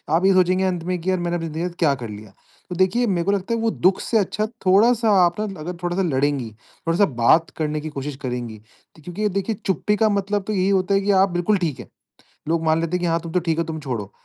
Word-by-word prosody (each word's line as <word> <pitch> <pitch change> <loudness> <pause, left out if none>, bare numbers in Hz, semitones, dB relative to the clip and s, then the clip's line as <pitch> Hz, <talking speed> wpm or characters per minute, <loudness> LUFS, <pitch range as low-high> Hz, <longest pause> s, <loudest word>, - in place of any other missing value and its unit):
आप 175 +3 +2
ये 195 - +5
सोचेंगे 185 0 +3
अंत 180 -3 -1
में 180 +1 -2
कि 180 - -2
यार 185 - 0
मैंने 175 0 -2
अपनी 165 -1 -3
ज़िंदगी 160 +1 -4
के 180 - -1
साथ 170 - -16
क्या 155 -5 +3
कर 120 -4 -7
लिया? 105 0 -10 0.4
तो 180 - -4
देखिए 190 +7 +2
मेरे 180 -4 0
को 200 - +2
लगता 200 +3 -1
है - - -2
वो 225 0 +1
दुःख 185 -1 +2
से 230 - 0
अच्छा 210 +1 0 0.2
थोड़ा-सा 220 +5 +4 0.2
आप 175 +3 -1
न 205 -2 -4
अगर 165 +3 -6
थोड़ा-सा 175 +2 0
लड़ेंगी, 140 -5 0 0.4
थोड़ा-सा 170 +5 +4 0.2
बात 160 +7 +5
करने 155 -1 -2
की 155 - -5
कोशिश 145 -1 -5
करेंगी। 120 -3 -4 0.5
क्योंकि 200 +6 -2
देखिए 200 +3 -2
चुप्पी 195 +2 +1
का 220 +1 +2
मतलब 200 0 -1
तो 215 - -1
यही 190 -1 +1
होता 195 0 +1
है 195 - +3
कि 200 +1 +1
आप 195 - +1
बिल्कुल 175 +4 +1
ठीक 165 -7 -2
है, - - -9 0.6
लोग 165 0 0
मान 160 0 +3
लेते 165 +2 -1
हैं - - -7
कि - - 0
हाँ 165 0 +1
तुम 165 -1 -7
तो 180 - +2
ठीक 165 -2 -1
हो 170 - +1
तुम 160 -1 -5
छोड़ो। 120 -9 -5
175 Hz, 265 wpm, -22 LUFS, 160-195 Hz, 0.6 s, ये